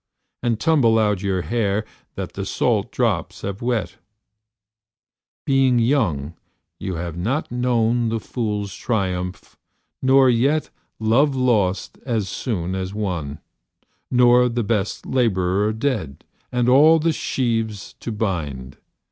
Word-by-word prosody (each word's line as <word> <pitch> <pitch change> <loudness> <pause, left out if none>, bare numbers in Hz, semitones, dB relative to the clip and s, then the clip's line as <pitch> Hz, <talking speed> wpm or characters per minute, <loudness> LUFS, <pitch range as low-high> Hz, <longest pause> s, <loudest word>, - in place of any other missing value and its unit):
And 115 -2 0
tumble 135 -9 +3
out 105 -3 +1
your 95 -2 -1
hair 110 -1 0 0.3
That - - -5
the - - -4
salt - - 0
drops - - -1
have 100 0 -4
wet; 115 -8 -2 1.5
Being 135 -2 +3
young 105 - +1 0.5
you 95 - -4
have 85 0 -4
not 120 - -2
known 120 -1 +1
The 115 0 -1
fool's 105 -5 -3
triumph, 95 -3 -3 0.4
nor 135 0 +5
yet 135 +6 +2 0.3
Love 130 +6 +2
lost 110 -7 0
as 115 -6 -1
soon 95 -4 -3
as 95 +1 -4
won, 85 -9 -3 0.7
Nor 125 0 +5
the 120 0 -1
best 105 -2 -1
labourer 105 -4 +1
dead 110 - -3 0.3
And 125 -1 +1
all 150 +6 +7
the 160 +1 +1
sheaves 115 -7 -2
to 115 - -5
bind. 75 - -3
110 Hz, 120 wpm, -22 LUFS, 95-125 Hz, 1.5 s, all